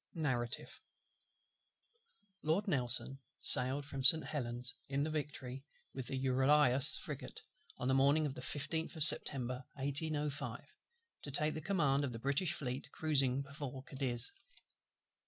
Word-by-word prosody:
Narrative 125 -7 -3 1.6
Lord 165 +7 0
NELSON 135 -3 -1 0.2
sailed 130 +3 +2
from 135 -2 -6
St. 160 +4 +7
Helen's 125 -3 -4 0.2
in 140 +1 0
the 155 - -2
Victory, 140 -4 -5 0.3
with 130 -3 -6
the 135 - -3
Euryalus 130 +1 +2
frigate, - - -6 0.4
on 125 - -3
the 130 - +2
morning 140 +4 +3
of 140 - -3
the 125 - -9
15th 160 +5 -2
of 160 - +2
September 130 -4 +6
1805, 145 +1 -2 0.5
to - - -8
take 150 +3 +2
the 155 - -5
command 145 -6 +1
of 130 -3 -3
the - - -5
British 140 +8 0
Fleet 135 +1 -4
cruizing 140 -4 +1
before 140 -2 -7
Cadiz. 135 - 0
140 Hz, 135 wpm, -35 LUFS, 130-150 Hz, 1.6 s, St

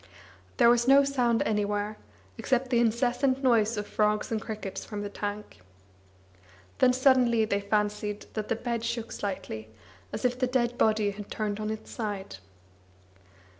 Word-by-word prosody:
There 235 - +6
was 240 0 +2
no 275 +1 +7
sound 250 -4 +1
anywhere, 210 0 -1 0.4
except 260 - -1
the 240 - +4
incessant 245 +3 +1
noise 230 -3 +3
of 210 - -2
frogs 210 +2 0
and 220 -1 -1
crickets 215 -4 -6
from 205 -1 -6
the 205 - -5
tank. 205 - -5 1.2
Then 255 - +6
suddenly 250 -3 +4
they 200 -1 -1
fancied 210 0 -1
that 215 -1 -3
the - - 0
bed 235 0 -3
shook 230 -1 -3
slightly, 110 - -5 0.4
as - - -4
if 250 0 +1
the 255 - +2
dead 245 -1 0
body 215 -3 +2
had 205 0 -9
turned 210 -1 -3
on 215 0 -3
its 220 0 -6
side. 205 - -5
220 Hz, 155 wpm, -28 LUFS, 210-245 Hz, 1.2 s, no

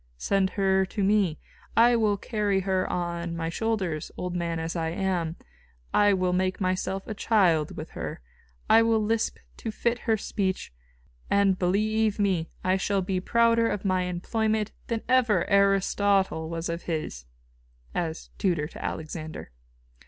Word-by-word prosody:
Send 195 - +1
her 190 -1 +3
to 195 +2 -3
me; 195 -5 +2 0.4
I 240 +1 +6
will 215 -3 +2
carry 205 -2 0
her 190 -1 0
on 170 -1 -3
my 165 0 -2
shoulders, 190 -6 -2
old 180 0 -3
man 170 -1 -1
as 165 +1 -3
I 165 -1 -1
am. 175 -2 -1 0.6
I 205 0 +5
will 185 -2 +1
make 185 0 0
myself 185 0 -1
a 220 - -4
child 185 -8 +2
with - - -7
her; - - -5 0.5
I 225 - +7
will 225 -1 +3
lisp 220 +1 0 0.2
to 225 - -5
fit 235 +2 -1
her 225 -2 +1
speech; 190 - -2 0.6
and, 200 -2 +3
believe 215 +3 +1
me, 190 -6 +1
I 185 +1 +2
shall 195 0 0
be 185 0 -1
prouder 230 +3 +3
of 205 -1 -3
my 185 -1 +1
employment 215 +4 -1 0.2
than 230 -2 -2
ever 245 -8 +3
Aristotle 195 -3 +2
was 165 0 -3
of 170 0 -3
his" 155 - -3 0.7
[as 165 -2 -3
tutor 170 -6 +1
to - - -9
Alexander. 155 - -5
190 Hz, 150 wpm, -27 LUFS, 175-210 Hz, 0.7 s, I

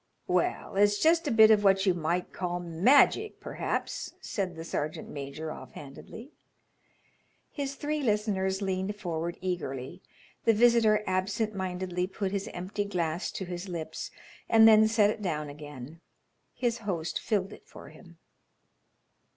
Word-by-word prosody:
"Well, - - -1
it's 205 0 +4
just 330 +3 +3
a - - +1
bit 220 -1 +7
of 210 -1 +4
what 195 0 +4
you 190 - +4
might 175 +1 -2
call 175 -1 -3
magic, 240 - +3
perhaps," - - -4
said 185 -4 -3
the 160 - -7
sergeant 155 -2 -4
major, 145 +2 -6
offhandedly. 150 - -11 1.2
His 280 -1 -4
three 300 +2 -2
listeners 205 -4 0
leaned 190 +1 -2
forward 170 -3 -4
eagerly. 175 -3 -4 0.4
The 225 - +4
visitor 225 -2 +4
absent 200 +4 -1
mindedly 180 -1 -2
put 195 0 -3
his 195 -1 -2
empty 190 +3 -4
glass 170 -4 -2
to 190 - -4
his 180 +2 -6
lips 165 -3 -5 0.4
and 225 -1 +7
then 220 0 +7
set 215 -2 +3
it 215 - -7
down 150 -6 -2
again. 145 +1 -10 0.5
His 240 -1 -1
host 180 -7 -3
filled 205 -2 -1
it - - -15
for - - -12
him. - - -16
190 Hz, 145 wpm, -29 LUFS, 175-215 Hz, 1.2 s, bit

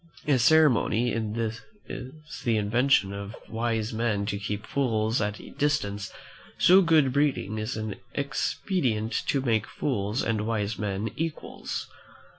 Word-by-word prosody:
As 140 -4 +3
ceremony 125 -5 +4
is 110 0 -2 0.8
the 115 -2 +2
invention 105 -1 +2
of 100 +2 -6
wise 115 0 -1
men 110 -3 0
to 100 -1 -2
keep 105 +1 -4
fools 115 -4 0
at 105 0 -2
a - - -11
distance, 105 -9 -1 0.5
so 185 +2 +7
good 155 -7 +4
breeding 135 -7 +1
is 110 +3 -3
an 110 -2 -4 0.2
expedient 130 - -1
to 140 - +2
make 115 -4 +1
fools 105 -4 -1
and 110 -1 -1
wise 110 -1 -1
men 105 +1 -2
equals. 165 -1 -4
115 Hz, 130 wpm, -27 LUFS, 105-135 Hz, 0.8 s, so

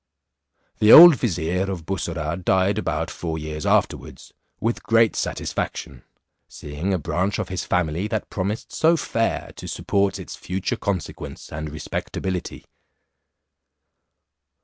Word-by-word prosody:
The 105 +1 +5
old 170 -1 +11
vizier 90 -4 -1
of 90 -5 -5
Bussorah 85 -2 -3
died 95 +3 +2
about - - -2
four 80 -2 -4
years 75 -1 -5
afterwards - - -1 0.3
with 115 +2 -1
great 115 0 +3
satisfaction, 60 -3 -4 0.4
seeing 75 +6 -5
a. 95 - +2
branch 90 +5 -1
of 105 -3 -3
his 95 -2 -3
family 85 +2 0
that 110 0 -4
promised 100 +3 -3
so 165 +1 +3
fair 115 -6 -2
to - - -8
support 100 0 0
its - - -8
future 95 +6 -3
consequence 100 -5 -5
and 75 +1 -5
respectability. 90 +4 -5
95 Hz, 125 wpm, -23 LUFS, 80-105 Hz, 0.4 s, old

